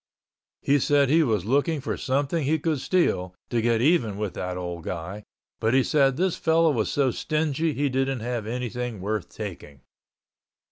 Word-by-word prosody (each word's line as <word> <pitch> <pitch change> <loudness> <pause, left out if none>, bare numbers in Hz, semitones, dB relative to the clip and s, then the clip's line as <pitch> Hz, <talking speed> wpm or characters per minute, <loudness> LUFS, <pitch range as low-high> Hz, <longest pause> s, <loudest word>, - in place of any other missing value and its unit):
He 145 +1 +3
said 140 0 +3
he 165 +2 +5
was 110 - +1
looking 145 +6 +1
for 130 - -3
something 145 +4 -1
he 155 +4 +2
could 155 -1 -1
steal, 90 - 0 0.2
to 120 -2 +1
get 115 0 +2
even 125 - +2
with 105 -2 -3
that 90 0 -4
old 90 -2 -5
guy, 90 +5 -5 0.4
but 110 +3 +1
he 135 - +5
said 135 -3 +2
this 185 0 +1
fellow 165 0 +3
was 115 -6 0
so 135 -3 +2
stingy 155 +2 -1
he 145 +1 +1
didn't 135 -1 -1
have 120 -2 -3
anything 125 -1 -4
worth 105 0 -3
taking. 70 -3 -8
130 Hz, 175 wpm, -25 LUFS, 110-150 Hz, 0.4 s, he